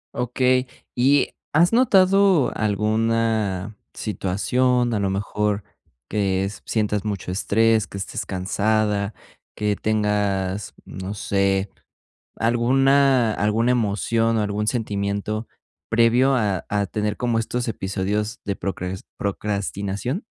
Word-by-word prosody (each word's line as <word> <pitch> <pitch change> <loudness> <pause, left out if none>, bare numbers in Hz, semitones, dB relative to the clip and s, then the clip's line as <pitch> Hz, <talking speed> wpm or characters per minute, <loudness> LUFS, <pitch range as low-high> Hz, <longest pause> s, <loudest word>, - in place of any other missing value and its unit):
Okey, 125 +1 +1 0.3
¿y 135 +3 +3 0.2
has 170 +7 +4
notado 195 - +4
alguna 110 -1 0 0.2
situación? 120 +5 0
A 105 - 0
lo 100 -1 0
mejor 105 +1 -1 0.4
que 95 -2 0 0.2
sientas 105 -2 0
mucho 100 -4 -4
estrés, 110 +2 +2
que - - -8
estés 100 - -4
cansada, 100 +2 0 0.4
que 105 -1 0
tengas, 105 -2 -1
no 95 +2 -6
sé, 100 -1 0 0.7
alguna 130 +1 +3
alguna 110 +4 +1
emoción 115 0 +1
o 110 - +1
algún 105 +1 -2
sentimiento 105 -1 -2 0.4
previo 120 +4 +4
a 105 -7 0
a 105 -1 0
tener 105 +1 -2
como 120 -2 0
estos 120 +2 -2
episodios 105 0 -2
de 100 -1 -2
procras 95 -1 -4
procrastinación. 100 - -3
105 Hz, 105 wpm, -22 LUFS, 100-120 Hz, 0.7 s, has